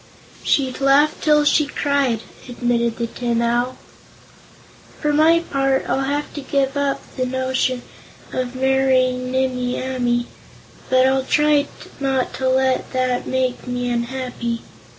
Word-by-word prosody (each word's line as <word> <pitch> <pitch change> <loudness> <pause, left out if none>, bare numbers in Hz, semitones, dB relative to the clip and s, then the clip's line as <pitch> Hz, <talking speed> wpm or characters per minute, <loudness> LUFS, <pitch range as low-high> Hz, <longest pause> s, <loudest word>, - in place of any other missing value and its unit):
"She'd 265 -1 0
laugh 285 +3 +4
till 300 -1 +4
she 295 0 +3
cried," 280 -7 0 0.3
admitted 235 -1 0
the 235 - -1
Tin 235 0 -2
Owl. 240 +2 0 1.2
"For 300 0 0
my 320 +3 +5
part, 270 -4 0
I'll - - 0
have 290 +2 -2
to 290 - -5
give 270 0 0
up 285 -1 -1
the 255 - 0
notion 260 -1 -1 0.5
of 255 0 -3
marrying 255 -1 +2
Nimmie 255 -1 -1
Amee, 245 -2 0 0.6
but 255 0 +4
I'll 265 0 +3
try 295 +1 +2 0.3
not 270 -2 0
to 260 0 -1
let 260 0 +1
that 255 -1 0
make 260 -1 -1
me 245 0 -2
unhappy. 235 -1 -3
260 Hz, 130 wpm, -20 LUFS, 245-275 Hz, 1.2 s, my